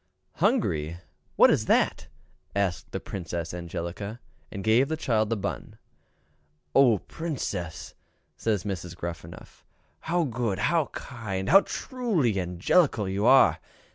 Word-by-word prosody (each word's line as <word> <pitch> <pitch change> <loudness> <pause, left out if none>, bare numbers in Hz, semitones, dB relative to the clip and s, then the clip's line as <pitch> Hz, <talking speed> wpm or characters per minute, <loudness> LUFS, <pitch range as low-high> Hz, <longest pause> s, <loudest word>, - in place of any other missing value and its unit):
"Hungry! 80 +2 +1 0.4
what - - +7
is - - +1
that?" - - +2 0.5
asked 100 -3 -1
Princess 85 -3 -5
Angelica, 90 +5 -5 0.3
and 100 -2 -6
gave 115 +5 +4
the 160 +1 -2
child 110 -8 +1
the 115 - 0
bun. 100 0 -5 1.0
"Oh, 125 -6 +6
Princess!" 95 - -5 0.4
says 105 +4 -1 0.3
Gruffanuff, 85 -1 -8 0.4
"how 175 +1 0
good, 120 -7 -2
how 155 +7 +1
kind, 100 -7 -5
how 195 +6 +9
truly 190 - -1
angelical 95 - +2
you 100 +4 0
are! 135 +1 +6
105 Hz, 110 wpm, -27 LUFS, 90-135 Hz, 1.0 s, how